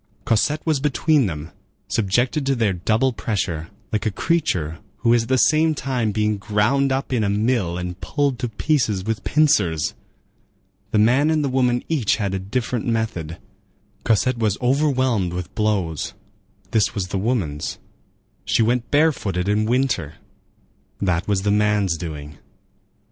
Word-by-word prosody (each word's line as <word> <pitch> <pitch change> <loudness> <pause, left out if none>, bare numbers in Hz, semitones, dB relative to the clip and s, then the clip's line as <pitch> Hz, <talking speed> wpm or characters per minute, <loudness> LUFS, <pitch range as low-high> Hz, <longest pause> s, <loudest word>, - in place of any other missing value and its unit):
Cosette 150 +7 +1
was 155 -4 +1
between 150 -1 +2
them, 80 -1 -6 0.4
subjected 120 +8 +1
to 135 - +2
their 110 -5 +1
double 110 +8 +1
pressure, 90 -8 -3 0.2
like 105 -1 0
a - - +1
creature 90 - -1 0.2
who 120 -1 +4
is 120 - +4
at 115 - -7
the 130 - +3
same 155 +4 +3
time 125 -6 -1
being 105 0 0
ground 110 +7 +1
up 135 0 -1
in 115 -3 +1
a 100 - +1
mill 105 -4 0
and 90 +1 -5
pulled 140 -4 -1
to 125 -2 -2
pieces 110 -5 0
with 110 -1 -2
pincers. 100 - +2 1.0
The - - 0
man 125 +8 +4
and 155 -1 +2
the 140 - 0
woman 125 -2 +1
each 140 -11 +1
had 100 -3 -2
a 95 - -1
different 115 +4 -2
method: 110 -9 -2 0.7
Cosette 115 +3 +2
was 105 -3 +1
overwhelmed 130 - +1
with 90 +1 -5
blows—this 100 +1 -2
was 95 -3 -2
the 95 - -2
woman's; 95 - -2 0.7
she 115 - +2
went 120 +1 0
barefooted 120 - +1
in 105 +1 +2
winter—that 95 - -3
was 100 -2 0
the 100 - +2
man's 105 -3 +2
doing. 75 -3 -7
110 Hz, 150 wpm, -22 LUFS, 95-130 Hz, 1.0 s, who